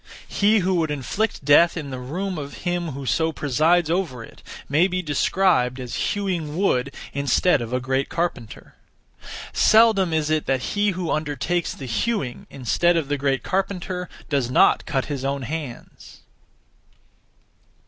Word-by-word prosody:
He 210 Hz, +1 st, +3 dB
who 185 Hz, +1 st, +1 dB
would 160 Hz, -2 st, 0 dB
inflict 150 Hz, -, -2 dB
death 165 Hz, +5 st, +5 dB
in 145 Hz, -4 st, -5 dB
the 130 Hz, -, -5 dB
room 175 Hz, +8 st, -4 dB
of 140 Hz, -1 st, -8 dB
him 175 Hz, -3 st, -1 dB
who 135 Hz, +1 st, -7 dB
so 160 Hz, +5 st, +1 dB
presides 155 Hz, +4 st, +2 dB
over 160 Hz, -8 st, -2 dB
it -, -, -15 dB, 0.3 s
may 155 Hz, +6 st, +3 dB
be 185 Hz, -1 st, -2 dB
described 145 Hz, -4 st, +1 dB
as 125 Hz, -2 st, -6 dB, 0.2 s
hewing 175 Hz, -7 st, -3 dB
wood 140 Hz, -9 st, +1 dB, 0.2 s
instead 140 Hz, +2 st, +2 dB
of 115 Hz, 0 st, -5 dB
a 125 Hz, -, 0 dB
great 130 Hz, +1 st, -1 dB
carpenter. 165 Hz, -10 st, -4 dB, 0.8 s
Seldom 220 Hz, -5 st, +5 dB
is 155 Hz, -1 st, 0 dB
it 155 Hz, -1 st, 0 dB
that 130 Hz, -2 st, 0 dB
he 205 Hz, 0 st, +2 dB
who 175 Hz, -3 st, -2 dB
undertakes 155 Hz, +3 st, -1 dB
the 135 Hz, -, -8 dB
hewing, 135 Hz, -, -2 dB
instead 170 Hz, +7 st, +1 dB
of 150 Hz, -4 st, -2 dB
the 145 Hz, -, 0 dB
great 135 Hz, -1 st, 0 dB
carpenter, 185 Hz, -1 st, -2 dB, 0.2 s
does 135 Hz, -5 st, 0 dB
not 125 Hz, -, +3 dB
cut 135 Hz, -3 st, -1 dB
his 140 Hz, -3 st, -4 dB
own 140 Hz, 0 st, -2 dB
hands! 145 Hz, -2 st, -8 dB
155 Hz, 155 wpm, -23 LUFS, 135-180 Hz, 0.8 s, death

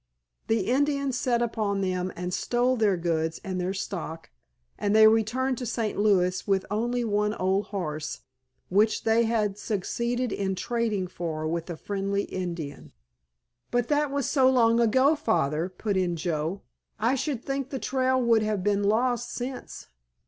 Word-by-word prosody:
The 225 Hz, -1 st, +2 dB
Indians 280 Hz, +4 st, +1 dB
set 245 Hz, -1 st, +1 dB
upon 210 Hz, -4 st, -1 dB
them 185 Hz, -1 st, -1 dB
and 180 Hz, +1 st, -4 dB
stole 245 Hz, +5 st, +1 dB
their 210 Hz, -5 st, +2 dB
goods 165 Hz, -1 st, -1 dB
and 185 Hz, -1 st, -3 dB
their 185 Hz, +2 st, -2 dB
stock, 165 Hz, -4 st, -5 dB, 0.5 s
and 205 Hz, 0 st, +1 dB
they 220 Hz, 0 st, +8 dB
returned 230 Hz, +4 st, +2 dB
to 250 Hz, -, -4 dB
St. 220 Hz, -1 st, -2 dB
Louis 185 Hz, -3 st, +2 dB
with 195 Hz, -1 st, +1 dB
only 240 Hz, +3 st, 0 dB
one 210 Hz, -1 st, 0 dB
old 190 Hz, +2 st, +1 dB
horse, 155 Hz, -6 st, -4 dB, 0.5 s
which 210 Hz, +3 st, +2 dB
they 225 Hz, +1 st, +3 dB
had 210 Hz, -3 st, 0 dB
succeeded 235 Hz, +4 st, -2 dB
in 190 Hz, -1 st, -1 dB
trading 220 Hz, -1 st, -1 dB
for 165 Hz, -3 st, -4 dB
with 165 Hz, +2 st, -3 dB
a 170 Hz, -, -4 dB
friendly 200 Hz, +1 st, -2 dB
Indian." 170 Hz, -6 st, -5 dB, 0.8 s
"But 245 Hz, -1 st, 0 dB
that 295 Hz, 0 st, +2 dB
was 280 Hz, -2 st, -1 dB
so 265 Hz, -3 st, +4 dB
long 235 Hz, -3 st, +4 dB
ago, 260 Hz, +6 st, +4 dB
Father," 170 Hz, -, 0 dB
put 200 Hz, +2 st, -3 dB
in 180 Hz, -2 st, +1 dB
Joe, 165 Hz, +2 st, -2 dB, 0.4 s
"I 230 Hz, +4 st, +2 dB
should 270 Hz, -2 st, -2 dB
think 275 Hz, -1 st, -2 dB
the 275 Hz, -, -3 dB
trail 260 Hz, 0 st, +1 dB
would 235 Hz, -3 st, +3 dB
have 210 Hz, -3 st, -1 dB
been 205 Hz, 0 st, +2 dB
lost 240 Hz, +4 st, +1 dB
since." 255 Hz, +1 st, -6 dB
210 Hz, 160 wpm, -27 LUFS, 185-245 Hz, 0.8 s, they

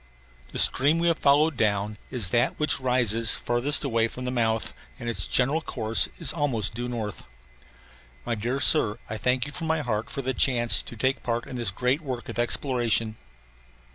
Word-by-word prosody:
The -, -, -8 dB
stream 145 Hz, +5 st, +5 dB
we 170 Hz, +1 st, +1 dB
have 165 Hz, -, -1 dB
followed 150 Hz, +2 st, +3 dB
down 105 Hz, -2 st, -1 dB
is 115 Hz, -8 st, -2 dB
that 120 Hz, +5 st, 0 dB
which 150 Hz, -2 st, +1 dB
rises 120 Hz, -4 st, +1 dB
farthest 120 Hz, +6 st, 0 dB
away 115 Hz, -4 st, 0 dB
from 125 Hz, +2 st, -8 dB
the 125 Hz, -, -2 dB
mouth 115 Hz, -3 st, -1 dB, 0.2 s
and -, -, -8 dB
its 115 Hz, -, -2 dB
general 140 Hz, +6 st, +1 dB
course 115 Hz, -6 st, +2 dB
is -, -, 0 dB
almost 130 Hz, -, -1 dB
due 120 Hz, +2 st, -5 dB
north. 110 Hz, -4 st, -5 dB, 1.0 s
My -, -, -2 dB
dear 120 Hz, +5 st, -3 dB
Sir, 120 Hz, -6 st, +4 dB
I 110 Hz, -, -3 dB
thank 125 Hz, +2 st, 0 dB
you 145 Hz, -, -8 dB
from 165 Hz, +1 st, -6 dB
my 160 Hz, -1 st, 0 dB
heart 110 Hz, -5 st, -3 dB
for 140 Hz, -, -5 dB
the 130 Hz, +1 st, -2 dB
chance 120 Hz, -2 st, +4 dB
to -, -, -11 dB
take 130 Hz, +4 st, -1 dB
part 120 Hz, 0 st, -3 dB
in -, -, -9 dB
this 120 Hz, -5 st, 0 dB
great 125 Hz, -, -1 dB
work 130 Hz, -5 st, -6 dB
of -, -, -5 dB
exploration. 120 Hz, -3 st, 0 dB
120 Hz, 190 wpm, -25 LUFS, 115-135 Hz, 1.0 s, stream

